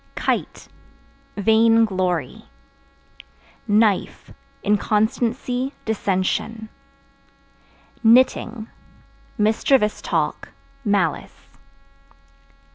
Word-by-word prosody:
Kite -, -, -3 dB, 0.7 s
Vain 225 Hz, +2 st, +4 dB
glory. 180 Hz, -, -3 dB, 1.2 s
Knife 210 Hz, -2 st, +1 dB, 0.3 s
Inconstancy, 230 Hz, +5 st, 0 dB
dissension. 220 Hz, +1 st, -2 dB, 1.3 s
Knitting 230 Hz, -1 st, +3 dB, 0.7 s
Mischievous 215 Hz, +1 st, +2 dB
talk, -, -, -2 dB, 0.3 s
malice. 205 Hz, -4 st, -1 dB
220 Hz, 45 wpm, -21 LUFS, 205-230 Hz, 1.3 s, Vain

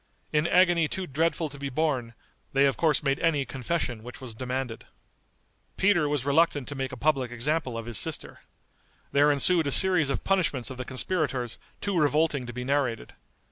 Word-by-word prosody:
In 150 Hz, +2 st, +2 dB
agony 175 Hz, -3 st, +4 dB
too 190 Hz, +4 st, -4 dB
dreadful 165 Hz, +2 st, 0 dB
to 140 Hz, 0 st, -11 dB
be 140 Hz, 0 st, -4 dB
borne, 130 Hz, -5 st, -1 dB, 0.4 s
they 135 Hz, +1 st, +4 dB
of 135 Hz, -, +2 dB
course 155 Hz, -4 st, +1 dB
made 135 Hz, -1 st, 0 dB
any 150 Hz, -4 st, +1 dB
confession 130 Hz, -3 st, -3 dB
which 125 Hz, +4 st, -10 dB
was 130 Hz, -4 st, -8 dB
demanded. 125 Hz, 0 st, -4 dB, 0.9 s
Peter 190 Hz, -7 st, +3 dB
was 145 Hz, -3 st, -1 dB
reluctant 145 Hz, -2 st, +2 dB
to -, -, -5 dB
make 135 Hz, -1 st, -4 dB
a 130 Hz, -, -7 dB
public 135 Hz, -2 st, +1 dB
example 125 Hz, +1 st, -2 dB
of 115 Hz, -, -6 dB
his 115 Hz, -5 st, 0 dB
sister. -, -, -3 dB, 0.7 s
There 145 Hz, +1 st, +4 dB
ensued 160 Hz, +3 st, +3 dB
a -, -, -1 dB
series 180 Hz, -6 st, +5 dB
of 135 Hz, -, -2 dB
punishments 160 Hz, -10 st, 0 dB
of 130 Hz, -, -8 dB
the 125 Hz, -, -5 dB
conspirators 130 Hz, -4 st, -2 dB, 0.2 s
too 200 Hz, -2 st, -2 dB
revolting 150 Hz, -3 st, +1 dB
to -, -, -5 dB
be 125 Hz, +1 st, -6 dB
narrated. 135 Hz, -3 st, -1 dB
140 Hz, 180 wpm, -27 LUFS, 125-160 Hz, 0.9 s, series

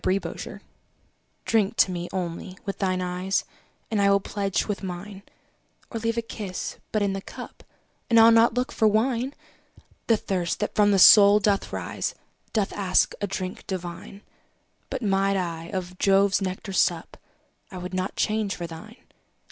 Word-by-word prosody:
Y 185 Hz, -, +2 dB
Z 195 Hz, -, +1 dB
To -, -, -6 dB
Celia -, -, -8 dB, 0.8 s
DRINK 220 Hz, -2 st, +1 dB
to 185 Hz, -, +4 dB
me, 175 Hz, -1 st, -4 dB
only, 185 Hz, 0 st, -5 dB
with 195 Hz, -, -4 dB
thine 185 Hz, -2 st, 0 dB
eyes, 180 Hz, +2 st, -1 dB, 0.5 s
And 215 Hz, -2 st, +1 dB
I 200 Hz, -, +4 dB
will 200 Hz, 0 st, +4 dB
pledge 195 Hz, -1 st, -2 dB
with 205 Hz, -2 st, -3 dB
mine; 190 Hz, +1 st, -7 dB, 0.7 s
Or 230 Hz, -, -3 dB
leave 230 Hz, +1 st, -1 dB
a 235 Hz, -, 0 dB
kiss 205 Hz, -5 st, -6 dB
but 215 Hz, -2 st, +1 dB
in 200 Hz, -1 st, 0 dB
the 195 Hz, -, -4 dB
cup, -, -, -10 dB, 0.5 s
And 230 Hz, -1 st, +6 dB
I'll 225 Hz, +1 st, +8 dB
not 230 Hz, +1 st, +5 dB
look 250 Hz, +3 st, -1 dB
for 220 Hz, -, +2 dB
wine. 240 Hz, +5 st, +1 dB, 0.7 s
The 225 Hz, -, +4 dB
thirst 180 Hz, -4 st, -2 dB
that 210 Hz, -, -2 dB
from 205 Hz, -1 st, +4 dB
the 200 Hz, -, +4 dB
soul 200 Hz, +2 st, +9 dB
doth 200 Hz, -1 st, 0 dB
rise, -, -, -3 dB, 0.4 s
Doth 210 Hz, -3 st, 0 dB
ask 190 Hz, -3 st, +2 dB
a 205 Hz, -, 0 dB
drink 185 Hz, -1 st, -5 dB
divine: 185 Hz, +2 st, -6 dB, 0.7 s
But 265 Hz, -3 st, -4 dB
might 195 Hz, -1 st, +2 dB
I 165 Hz, -3 st, -3 dB
of 180 Hz, 0 st, -6 dB
Jove's 195 Hz, 0 st, +3 dB
nectar 190 Hz, +1 st, -4 dB
sup, 175 Hz, -2 st, +1 dB, 0.5 s
I 190 Hz, -, -9 dB
would 180 Hz, +1 st, -7 dB
not 185 Hz, +1 st, -2 dB
change 215 Hz, -3 st, 0 dB
for 175 Hz, -, -5 dB
thine. 190 Hz, +8 st, -10 dB
195 Hz, 175 wpm, -25 LUFS, 185-215 Hz, 0.8 s, soul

